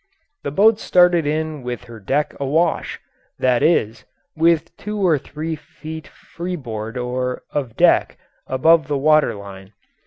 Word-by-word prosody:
The - - -3
boat 210 +8 +4
started 175 -3 +4
in 155 -1 -2
with 125 -1 -5
her 115 -1 -11
deck 145 +9 -1
awash 150 +5 0 0.4
that 125 -2 +2
is, 115 -9 +1 0.3
with 165 0 +2
two 210 +1 -6
or 175 -7 +2
three 160 +4 -5
feet 155 +1 -10
freeboard 130 -10 -6
or 125 +1 -3
of 130 -6 -3
deck - - +3 0.3
above 160 +5 +3
the 145 -1 0
water 155 -4 +3
line. 100 0 -11
150 Hz, 135 wpm, -20 LUFS, 125-165 Hz, 0.4 s, boat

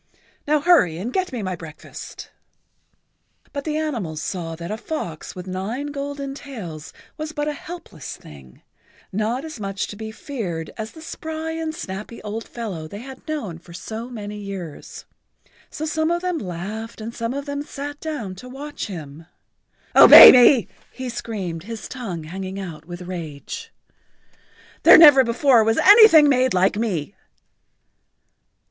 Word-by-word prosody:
Now 300 0 +2
hurry 290 - +4
and 225 +8 -5
get 375 -1 -1
me 240 -5 -4
my 185 -1 -3
breakfast." 160 -2 -10 1.1
[Pg - - -31
80]But 280 -1 -4
the 305 -1 -1
animals 230 - -3
saw 165 -1 -4
that 170 +3 -7
a 215 - -3
fox 215 - -6
with 180 -1 -7
nine 210 +10 -4
golden 280 -1 -5
tails 200 - -8 0.3
was 310 0 -5
but 295 -1 -2
a 300 - -1
helpless 345 - -9
thing, 65 -4 -15 0.5
not 225 +8 -1
as 315 -7 -8
much 195 -1 -3
to - - -7
be 220 +1 -7
feared 195 - -5
as 220 0 -6
the 320 - -12
spry 320 0 -5
and 320 -1 -4
snappy 210 - -7
old 215 +2 -5
fellow 195 -10 -6
they 200 +6 -9
had 265 +4 -11
known 225 - -4
for 170 0 -15
so 220 +6 -7
many 210 -3 -7
years. 195 -6 -8 0.6
So 310 - -5
some 315 0 0
of 345 +1 -1
them 360 -3 -1
laughed 205 - -6
and 225 +2 -6
some 230 +2 -3
of 280 0 -4
them 285 0 -4
sat 290 0 -7
down 290 -12 -5
to 250 +5 -10
watch 290 +3 -6
him. 160 -4 -9 0.7
"Obey - - +12
me!" 245 -1 +6 0.2
he 260 -1 -6
screamed, 195 -8 -5
his 225 -3 -7
tongue 195 - -6
hanging 190 +4 -6
out 160 -5 -8
with 175 +1 -8
rage. 165 -6 -7 1.1
"There - - +9
never 290 -5 +9
before 240 0 +4
was 225 +1 +1
anything 405 -7 +8
made 255 -4 +2
like 185 +2 +3
me." 200 -6 -2
225 Hz, 160 wpm, -22 LUFS, 185-285 Hz, 1.1 s, Obey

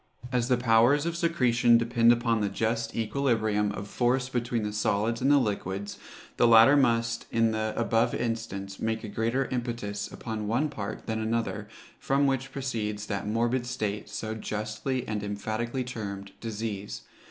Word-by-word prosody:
As 125 -2 +1
the 125 -1 +3
powers 120 +5 +4
of 170 0 -1
secretion 125 -9 +3
depend 115 0 +4
upon 115 -2 +2
the 100 - +1
just 115 +3 -1
equilibrium 110 -4 +1
of 100 0 -6
force 125 +3 +1
between 120 -2 -1
the 105 0 -3
solids 105 +2 0
and 135 - +3
the 145 - +6
liquids, 100 -4 -2 0.4
the 120 - +5
latter 115 +5 +8
must, 115 -4 +1
in 115 -1 +2
the 110 0 -1
above 115 -1 +2
instance, 100 -4 -3
make 110 0 -2
a - - -5
greater 115 +6 0
impetus 120 -5 -3
upon 110 -3 -5
one 125 +8 +1
part 110 -8 -6
than 110 0 -2
another, 110 -2 -2 0.3
from 140 +1 +2
which 135 0 0
proceeds 110 -6 -3
that 100 -1 -3
morbid 120 +3 0
state 105 -4 -3
so 110 0 -4
justly 110 +4 -3
and 105 -1 -2
emphatically 110 +5 -3
termed 100 -5 -6
Disease. 110 -2 -5
115 Hz, 160 wpm, -28 LUFS, 105-125 Hz, 0.4 s, latter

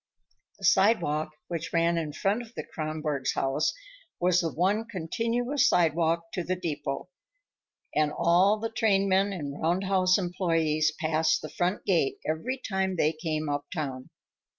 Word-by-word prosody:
The - - -5
sidewalk 155 -8 +3 0.2
which 170 -2 -4
ran 170 0 +2
in 155 -2 -3
front 195 +9 0
of 235 0 -13
the - - -4
Kronborgs' 155 -3 -3
house 135 +3 +1 0.5
was 180 0 +3
the 165 -2 -2
one 200 +6 +1
continuous 230 - 0
sidewalk 165 0 +1
to 180 - -2
the 185 +2 -1
depot, 150 -3 -4 0.8
and 150 -1 +2
all 180 +7 +3
the 225 +1 -4
train 200 -3 +2
men 195 +1 +3
and 145 -6 -5
roundhouse 185 +2 +2
employees 165 -4 +1
passed 155 0 +1
the 155 - -5
front 180 +3 -1
gate 165 -8 +2
every 160 +13 -2
time 190 -6 -2
they 155 -2 +2
came 155 -1 -3
uptown. 145 -2 -4
170 Hz, 145 wpm, -28 LUFS, 155-195 Hz, 0.8 s, sidewalk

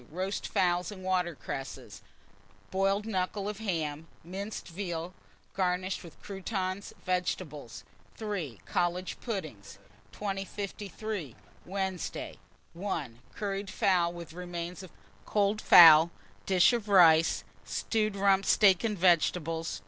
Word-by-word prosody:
Roast 185 +5 -3
fowls 175 +1 +1
and 190 -2 -10
water 180 -3 0
cresses, 135 -1 -7 0.7
boiled 195 +2 +1
knuckle 195 -1 -2
of 210 0 -4
ham, 160 -7 -3 0.2
minced 195 +5 -6
veal 175 -1 -5 0.4
garnished 185 0 -1
with 170 -3 -13
croutons; 195 -1 -4
vegetables. 150 - -3 0.3
3. 180 - -4
College 180 +1 -1
puddings. 155 - -6 0.3
2053. 200 - -5 0.3
Wednesday. 190 -2 -4 0.3
1. 165 - -4 0.2
Curried 200 -2 -3
fowl 180 -5 +2
with 170 -2 -9
remains 175 +1 -6
of 185 - -10 0.4
cold 210 +1 +1
fowl; 160 -1 +9 0.4
dish 190 +4 +5
of 225 -3 -2
rice, 165 -4 +6 0.2
stewed 215 -2 -1
rump 195 -1 +3
steak 195 -2 +4
and 215 -3 -1
vegetables. 165 -2 +1
185 Hz, 110 wpm, -30 LUFS, 170-200 Hz, 0.7 s, fowl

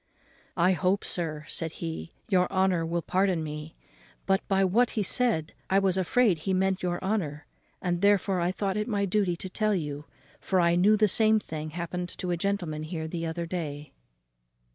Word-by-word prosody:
"I 175 +2 +4
hope, 185 +2 +1
sir," 155 -3 -3
said 160 -1 -3
he, 165 0 -6
"your 185 -4 +2
honour 190 -3 +2
will 170 0 -1
pardon 185 -3 +1
me, 150 +1 -6 0.5
but, 195 0 +2
by 195 -1 +3
what 225 +6 +3
he 210 - +2
said, 200 -8 +1 0.2
I 190 - +3
was 195 -2 +3
afraid 190 0 +2
he 190 +4 -1
meant 190 0 +1
your 175 -1 -1
honour; 175 -8 -2 0.4
and 175 -1 0
therefore 200 -2 +3
I 175 +1 +1
thought 195 +1 -2
it 210 - -1
my 205 -4 0
duty 195 -2 +1
to 180 - -6
tell 215 +2 0
you; 150 -4 -4 0.3
for 190 - 0
I 170 -1 +4
knew 205 +5 +5
the 215 0 +4
same 220 +2 +4
thing 155 -5 -6
happen 175 +2 -4
to 180 0 -5
a - - +2
gentleman 175 -4 -2
here 160 0 -4
the 165 0 -3
other 170 +1 -3
day." 150 -4 -5
180 Hz, 185 wpm, -28 LUFS, 165-195 Hz, 0.5 s, knew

